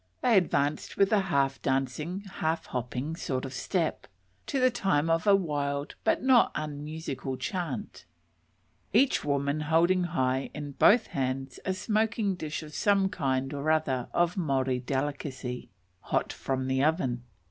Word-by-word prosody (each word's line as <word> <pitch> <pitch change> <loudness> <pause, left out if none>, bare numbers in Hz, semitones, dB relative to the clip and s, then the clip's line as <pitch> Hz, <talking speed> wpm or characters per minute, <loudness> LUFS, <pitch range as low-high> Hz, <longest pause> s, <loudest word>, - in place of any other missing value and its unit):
They 240 -3 +4
advanced 155 -5 +1
with 195 +1 +4
a 210 - +5
half 140 -8 0
dancing, 135 +8 -1
half 165 -5 -2
hopping 125 +5 -3
sort 130 -5 -3
of 135 - -6
step, 165 +4 -1 0.4
to 275 - 0
the 255 0 +4
time 175 -9 +1
of 165 +5 +1
a 200 - +8
wild 145 -5 -1
but - - +2
not 260 -3 +5
unmusical 150 -2 -4
chant, 175 - -4 0.9
each 255 +6 +4
woman 140 +1 0
holding 170 +4 +3
high 130 -6 0
in 145 -1 -5
both 220 - +5
hands 135 -1 -3
a 190 - 0
smoking 215 0 0
dish 155 -4 -5
of 150 -1 -11
some 195 +1 +3
kind 135 -6 -1
or 145 +2 -2
other 150 -6 +1
of 175 +2 +1
Maori 135 -6 +1
delicacy, 130 -1 -3 0.3
hot - - -1
from 130 -1 -2
the 130 +1 +1
oven. 145 -6 +1
150 Hz, 145 wpm, -29 LUFS, 135-185 Hz, 0.9 s, a